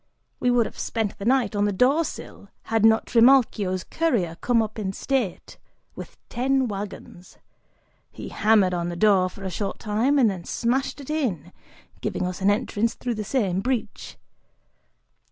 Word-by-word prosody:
We 250 - +1
would 245 -2 +3
have - - -9
spent 220 -3 -3
the 200 - -6
night 245 -4 +2
on 205 0 +2
the 205 - +1
door 260 - +3
sill 200 -8 -9 0.2
had 225 -1 +2
not 220 0 +5
Trimalchio's 230 -7 +3
courier 235 - -1
come 235 -2 +2
up 220 +1 -6
in 195 -2 -3
state, 245 -6 -3 0.4
with - - -10
ten 265 +1 0
wagons; 195 -3 -8 0.7
he - - -9
hammered 210 -4 +3
on 175 -1 -2
the 175 - -5
door 190 -1 +3
for 195 - -12
a 190 - -4
short 195 +3 -3
time, 230 +7 +1
and 255 -5 +5
then 190 -4 -3
smashed 265 +8 -1
it 280 - -7
in, 190 - -2 0.5
giving - - -2
us 180 +1 -5
an 195 - +3
entrance 210 +2 0
through 245 -1 -3
the 215 -1 -4
same 200 -5 0
breach. 230 -2 -4
215 Hz, 170 wpm, -24 LUFS, 195-250 Hz, 0.7 s, not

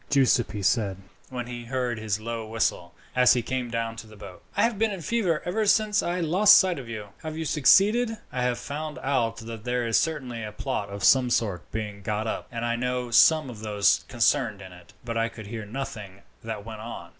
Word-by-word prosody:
Giuseppi 125 -6 +2
said, 100 -2 +1 0.3
when 125 -2 -4
he 120 -1 -7
heard 125 -2 -2
his 110 -2 -2
low 115 0 -5
whistle, 100 -6 -1 0.2
as 125 0 +6
he 120 - 0
came 130 -1 -3
down 115 -1 -2
to 115 - -9
the 110 - -14
boat. 100 -3 -11 0.2
"I - - +4
have 230 -3 +1
been 225 0 +3
in 200 - -4
a - - -9
fever 185 -9 0
ever 215 +4 0
since 215 0 +3
I 175 +1 -2
lost 185 +6 +6
sight 185 -6 +2
of 125 -3 -9
you. 105 -3 -6
Have 155 0 -6
you 160 - -3
succeeded?" 210 - +4
"I 125 - -2
have 125 -1 +1
found 150 +1 -5
out 120 -4 0
that 115 -2 -8
there 125 0 -1
is 115 -1 +3
certainly 130 -8 -3
a 105 - -5
plot 105 -4 -3
of 100 -1 -7
some 130 +4 +5
sort 105 -6 -1
being 105 -2 -5
got 105 +2 -2
up, 110 - -3
and 115 0 -3
I 120 0 0
know 125 0 -2
some 155 +5 +5
of 120 -4 -8
those 105 -2 +2
concerned - - +1
in 95 - -10
it, 90 -1 -16
but 115 -1 -3
I 115 0 +1
could 110 -2 -10
hear 110 0 -6
nothing 105 -5 -7 0.2
that 110 -2 -5
went 110 -1 -8
on. 115 +2 -8
120 Hz, 225 wpm, -26 LUFS, 110-140 Hz, 0.3 s, as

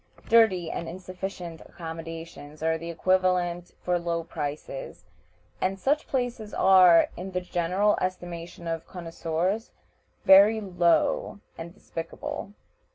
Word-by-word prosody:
Dirty 210 -8 +4
and 165 - -4
insufficient 180 -1 -7
accommodations 165 -2 -8
are 160 0 +2
the 165 +1 -6
equivalents 180 0 +1
for 180 -1 +1
low 170 -1 -2
prices, 155 - -6 0.6
and 190 +1 0
such 290 +8 +1
places 245 -5 -3
are, 185 -3 +6
in 190 +2 -7
the 180 - +1
general 180 +4 +1
estimation 175 -2 -5
of 165 -1 -3
connoiseurs, 175 +4 -2 0.6
very 200 +3 +8
low 180 -1 +1 0.2
and 165 +1 -8
despicable. 165 +3 -6
175 Hz, 110 wpm, -27 LUFS, 165-190 Hz, 0.6 s, very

